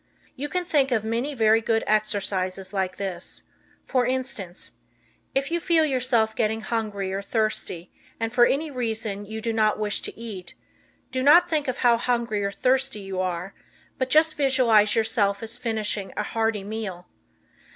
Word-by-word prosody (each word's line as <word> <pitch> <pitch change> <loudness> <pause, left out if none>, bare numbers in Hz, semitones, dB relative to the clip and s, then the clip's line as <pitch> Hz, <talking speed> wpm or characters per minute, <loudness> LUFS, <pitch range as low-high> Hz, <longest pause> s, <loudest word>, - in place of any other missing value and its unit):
You 290 +2 -4
can 360 +2 -1
think 280 -6 +2
of 225 -3 +1
many 235 +6 -2
very 225 -1 +4
good 225 0 +1
exercises 195 -3 0
like 190 -2 -1
this. 190 -3 -5 0.4
For 250 -2 +1
instance, 250 -9 -3 0.6
if 275 +3 0
you 340 - +1
feel 330 -2 +3
yourself 245 -5 +1
getting 220 0 0
hungry 210 -4 -2
or 195 - -2
thirsty 200 -5 -2 0.3
and 225 0 -2
for 240 -1 +6
any 300 +2 -1
reason 220 -5 -3
you 220 +1 -5
do 230 0 -1
not 215 -1 +2
wish 210 -1 -1
to - - -4
eat, 210 -6 -7 0.6
do 260 - -1
not 335 +6 +7
think 310 -4 0
of 255 - -1
how 240 -2 +4
hungry 235 -4 0
or 200 - -1
thirsty 260 0 0
you 195 -1 -5
are, 180 +1 -3 0.5
but 260 0 0
just 310 +2 +4
visualize 250 -7 +4
yourself 220 -2 +1
as 225 +2 -6
finishing 215 -4 -2
a 210 - 0
hearty 220 -1 -1
meal. 200 -4 -5
225 Hz, 165 wpm, -25 LUFS, 205-255 Hz, 0.6 s, not